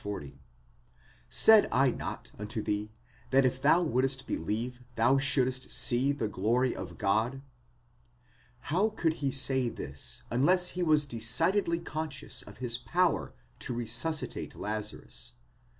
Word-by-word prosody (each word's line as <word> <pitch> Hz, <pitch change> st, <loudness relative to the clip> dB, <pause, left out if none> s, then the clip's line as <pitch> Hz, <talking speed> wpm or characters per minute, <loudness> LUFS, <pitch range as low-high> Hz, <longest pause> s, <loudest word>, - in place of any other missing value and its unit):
40): 100 Hz, -9 st, -6 dB, 0.9 s
Said 220 Hz, -1 st, +7 dB
I 135 Hz, 0 st, +4 dB
not -, -, -6 dB
unto 105 Hz, +1 st, -4 dB
thee 105 Hz, +1 st, -2 dB, 0.4 s
that 135 Hz, +1 st, +4 dB
tf 130 Hz, 0 st, 0 dB
thou 165 Hz, +5 st, +5 dB
wouldst 130 Hz, -2 st, 0 dB
believe 115 Hz, +8 st, -3 dB
thou 120 Hz, +4 st, +4 dB
shouldst 130 Hz, -2 st, 0 dB
see 130 Hz, +3 st, +2 dB
the 140 Hz, -6 st, -2 dB
glory 115 Hz, +6 st, +1 dB
of 85 Hz, -3 st, -7 dB
God? 110 Hz, +7 st, 0 dB, 1.3 s
Wow 195 Hz, +7 st, +3 dB
could 160 Hz, -2 st, +1 dB
he 140 Hz, -, +1 dB
say 130 Hz, -2 st, +1 dB
this 70 Hz, -10 st, -6 dB
unless 180 Hz, +9 st, +3 dB
he 180 Hz, -, -4 dB
was 155 Hz, -3 st, +3 dB
decidedly 165 Hz, -, +1 dB
conscious 155 Hz, -4 st, -5 dB
of -, -, -13 dB
his 120 Hz, -2 st, -2 dB
power 175 Hz, +5 st, 0 dB, 0.2 s
to 120 Hz, -, -4 dB
resuscitate 120 Hz, +7 st, -2 dB
Lazarus 105 Hz, 0 st, -5 dB
130 Hz, 130 wpm, -30 LUFS, 115-150 Hz, 1.3 s, Said